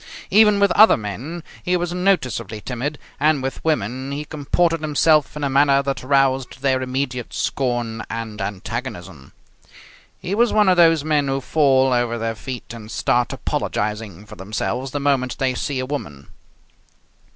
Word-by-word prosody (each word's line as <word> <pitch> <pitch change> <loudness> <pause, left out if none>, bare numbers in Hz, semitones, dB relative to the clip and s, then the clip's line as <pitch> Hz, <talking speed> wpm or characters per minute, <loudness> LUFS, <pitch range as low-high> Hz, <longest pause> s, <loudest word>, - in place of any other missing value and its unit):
Even 210 0 +5
with 200 0 +4
other 215 +2 +7
men 130 +11 -6 0.2
he 180 0 +1
was 175 0 -3
noticeably 125 - 0
timid, 125 +6 -4 0.2
and 150 -2 +2
with 135 - -4
women 130 -3 -1
he 145 +2 -4
comported 160 +2 0
himself 155 0 +2
in 150 - -4
a - - +2
manner 140 0 +3
that 140 0 -2
roused 135 -1 +1
their 130 -1 +2
immediate 130 -1 -3
scorn 120 -4 -2
and 115 -2 -5
antagonism. 95 - -6 0.9
He 180 - -4
was 235 +2 +3
one 210 -2 +4
of 180 - +3
those 165 -3 +5
men 150 -2 +1
who 135 0 0
fall 135 -2 +3
over 120 -1 0
their 115 0 -2
feet 125 +1 -7
and 110 -2 -10
start 120 -1 0
apologizing 105 -2 -3
for 105 +1 -11
themselves 105 +6 -3
the 145 - -3
moment 135 -3 0
they 130 -1 0
see 135 +2 -3
a 130 - -2
woman. 75 - -6
135 Hz, 160 wpm, -21 LUFS, 115-150 Hz, 0.9 s, other